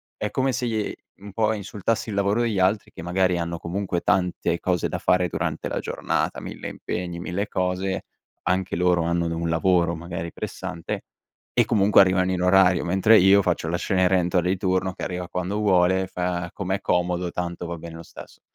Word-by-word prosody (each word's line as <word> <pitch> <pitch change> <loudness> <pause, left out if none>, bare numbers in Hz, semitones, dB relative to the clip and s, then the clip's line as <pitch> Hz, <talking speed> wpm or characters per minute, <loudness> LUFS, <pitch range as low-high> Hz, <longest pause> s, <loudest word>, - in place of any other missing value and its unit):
è 105 - -3
come 135 0 +1
se 125 0 -2
i 110 -3 -2 0.2
un 100 0 -11
po' 110 0 +1
insultassi 105 +2 -2
il 100 - -4
lavoro 100 +3 +1
degli 110 -5 0
altri, 100 +3 +1
che - - -9
magari 90 +1 +1
hanno 85 0 -3
comunque 90 +1 -3
tante 90 -2 0
cose 90 -2 0
da - - -4
fare 90 0 +2
durante - - -3
la - - -2
giornata - - -2
1000 - - -7
impegni, 85 -1 -5
1000 90 +4 -3
cose. 95 +1 -1 0.4
Anche 95 +1 0
loro 90 0 +2
hanno 85 0 0
un 85 0 -2
lavoro 85 0 +2
magari 85 0 -6
pressante 95 -5 -5 0.5
e - - +4
comunque 105 -1 +4
arrivano 95 -1 +3
in 90 - -1
orario, 90 -1 +4
mentre 95 +5 +5
io 95 +2 +6
faccio 85 -3 -1
la 85 +1 0
Cenerentola 90 -2 +2
di 95 - +2
turno, 95 0 0
che - - -8
arriva 90 -1 -4
quando 90 +3 -3
vuole, 95 -2 +3
fa 90 -1 -3
com'è 95 0 -2
comodo, 90 -1 0
tanto 85 0 -4
va 85 0 -5
bene 85 0 -9
lo 85 - -9
stesso. - - -13
90 Hz, 185 wpm, -24 LUFS, 85-95 Hz, 0.5 s, io